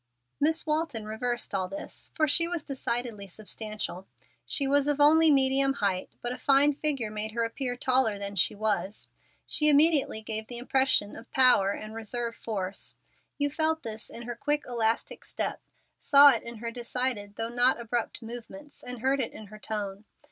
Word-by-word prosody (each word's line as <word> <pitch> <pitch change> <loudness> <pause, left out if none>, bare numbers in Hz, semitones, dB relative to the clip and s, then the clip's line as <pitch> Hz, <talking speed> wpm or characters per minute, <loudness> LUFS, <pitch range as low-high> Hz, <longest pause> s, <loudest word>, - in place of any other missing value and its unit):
Miss 315 +2 +1
Walton 305 -8 -1
reversed 240 +3 -2
all 185 -1 0
this, 195 +2 -7
for 310 -2 +2
she 335 +4 +3
was 345 -3 -3
decidedly 240 -7 -3
substantial. 210 -1 -5 0.4
She 280 - +1
was 285 +1 +3
of 290 -1 +1
only 315 +2 +6
medium 270 -1 +4
height, 195 -7 -1
but 240 - -1
a 250 - -6
fine 280 +1 +4
figure 275 -7 -1
made 215 0 -4
her 235 0 0
appear 245 +2 -2
taller 255 -5 +2
than 200 0 -6
she 180 - +2
was. 205 -2 -2 0.4
She 300 -1 +2
immediately 290 -6 +4
gave 220 0 -2
the 240 - -5
impression 255 -4 +1
of 235 - -12
power 250 -7 +5
and 215 +1 -8
reserve 230 +1 -4
force. 195 -5 -4 0.4
You 285 0 +1
felt 320 +1 0
this 220 -1 -5
in 235 - -6
her 240 0 -5
quick, 295 +4 0
elastic 230 -2 -1
step, - - -3 0.4
saw 285 0 +8
it - - 0
in 235 0 -8
her 230 +1 -5
decided 235 -3 -3
though 225 +1 -3
not 245 +1 +2
abrupt 235 0 -3
movements, 245 +6 -9
and 250 -2 -6
heard 270 +2 +2
it 250 - -2
in 215 - -10
her 215 - -10
tone. 205 -1 -5
240 Hz, 175 wpm, -28 LUFS, 215-275 Hz, 0.4 s, saw